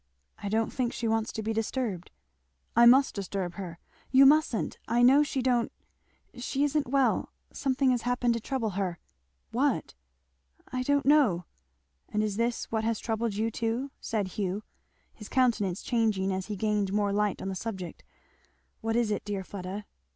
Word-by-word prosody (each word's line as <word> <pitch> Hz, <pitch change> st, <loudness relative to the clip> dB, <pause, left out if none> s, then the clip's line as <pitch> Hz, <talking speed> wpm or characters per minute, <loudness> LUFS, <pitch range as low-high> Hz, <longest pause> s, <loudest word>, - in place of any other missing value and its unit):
"I 205 Hz, -, -3 dB
don't 220 Hz, +2 st, 0 dB
think 250 Hz, -2 st, -1 dB
she 235 Hz, -, -2 dB
wants 225 Hz, 0 st, 0 dB
to 220 Hz, -, -4 dB
be 225 Hz, +1 st, -1 dB
disturbed 220 Hz, -4 st, -2 dB, 0.4 s
" 65 Hz, 0 st, -44 dB
"I 235 Hz, +1 st, +8 dB
must 265 Hz, +3 st, +6 dB
disturb 195 Hz, -3 st, -3 dB
her 175 Hz, -4 st, -7 dB, 0.2 s
" -, -, -31 dB
"You 275 Hz, -, +9 dB
musn't! 290 Hz, -5 st, +3 dB
I 240 Hz, +1 st, +3 dB
know 270 Hz, +4 st, +7 dB
she 275 Hz, -3 st, -1 dB
don't 245 Hz, -2 st, +2 dB, 0.6 s
she 260 Hz, +3 st, -1 dB
isn't 290 Hz, -1 st, +1 dB
well 270 Hz, 0 st, +2 dB, 0.2 s
something 265 Hz, -1 st, +1 dB
has 245 Hz, -2 st, +1 dB
happened 245 Hz, 0 st, +1 dB
to 230 Hz, -, -1 dB
trouble 230 Hz, -2 st, -2 dB
her 185 Hz, -2 st, -2 dB, 0.3 s
" 65 Hz, -1 st, -46 dB
"What?" -, -, +1 dB, 0.8 s
"I 255 Hz, -, 0 dB
don't 285 Hz, +2 st, +1 dB
know." 260 Hz, -, +4 dB, 0.6 s
"And 210 Hz, 0 st, 0 dB
is 210 Hz, -2 st, -2 dB
that 235 Hz, +1 st, 0 dB
what 220 Hz, -1 st, 0 dB
has 225 Hz, -1 st, 0 dB
troubled 225 Hz, -2 st, -2 dB
you 220 Hz, +2 st, 0 dB
too?" 235 Hz, +5 st, -2 dB
said 205 Hz, -4 st, -2 dB
Hugh, 195 Hz, +1 st, -3 dB, 0.5 s
his 210 Hz, -, -11 dB
countenance 225 Hz, -8 st, +1 dB
changing 215 Hz, -5 st, +1 dB
as 190 Hz, 0 st, -3 dB
he 210 Hz, -, -3 dB
gained 210 Hz, -1 st, 0 dB
more 205 Hz, 0 st, +1 dB
light 210 Hz, -1 st, +1 dB
on 190 Hz, -, -4 dB
the 190 Hz, -, -3 dB
subject; 185 Hz, -4 st, -6 dB, 0.8 s
"what 225 Hz, 0 st, -1 dB
is 235 Hz, -2 st, +2 dB
it, 210 Hz, -, -1 dB
dear 200 Hz, -2 st, -3 dB
Fleda?" 195 Hz, +2 st, -6 dB
225 Hz, 180 wpm, -29 LUFS, 200-245 Hz, 0.8 s, You